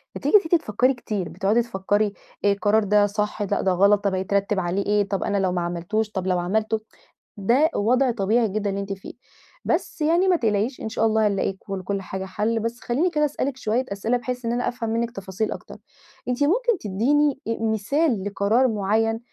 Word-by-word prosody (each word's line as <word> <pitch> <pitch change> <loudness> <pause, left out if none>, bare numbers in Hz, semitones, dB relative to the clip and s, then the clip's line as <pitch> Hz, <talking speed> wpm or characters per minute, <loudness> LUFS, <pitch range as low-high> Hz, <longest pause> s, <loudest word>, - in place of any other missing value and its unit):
بتيجي - - +1
أنتِ 345 -3 -2
أنتِ - - +9
تفكِّري 250 +2 +1
كتير، 210 -7 -4
بتقعدي 210 +5 +1
تفكِّري: 205 -2 0 0.3
"آآ، 200 - +5
القرار 205 +2 +2
ده 205 0 +4
صح؟ 210 +1 -2
لأ، 205 0 -1
ده 190 - +2
غلط، 200 +2 +4
طب، 195 -2 +1
هيترتَّب 200 +1 0
عليه 185 +3 -1
إيه؟ 205 -1 +2
طب، 195 - -1
أنا 205 -1 0
لو 190 -2 +1
ما 180 - -1
عملتوش؟ 175 +6 -2
طب، 190 -3 -3
لو 180 -1 +1
عملته؟" 215 +5 0 0.6
ده 245 +10 +3
وضع 250 +5 +2
طبيعي 225 +2 +1
جدًا 205 +1 -2
اللي 200 +1 -3
أنتِ 195 0 -4
فيه. 190 - -10 0.5
بس 320 - -1
يعني 340 +5 +3
ما 360 - +5
تقلقيش، 225 -1 0
إن - - -3
شاء 225 - 0
الله، 220 -1 +3
هنلاقي 195 -1 0
كل 195 0 -6
لكُل 195 +1 -3
حاجة 190 0 -5
حل. 215 +4 -1
بس، 230 +2 -3
خلِّيني 285 +9 0
كده 300 -2 +2
أسألِك 280 -2 -2
شوية 240 +2 0
أسئلة، 225 +5 0
بحيث 250 0 -5
إن 230 - 0
أنا 245 +1 -1
أفهم 235 -2 -4
منِّك 230 +1 -1
تفاصيل 195 +1 -4
أكتر. - - -8 0.5
أنتِ 250 +3 0
ممكن 460 +7 +2
تدِّيني 270 +8 +1 0.2
مثال 225 - +1
لقرار 205 +5 +2
معيَّن 220 +2 0
215 Hz, 200 wpm, -23 LUFS, 200-245 Hz, 0.6 s, أنتِ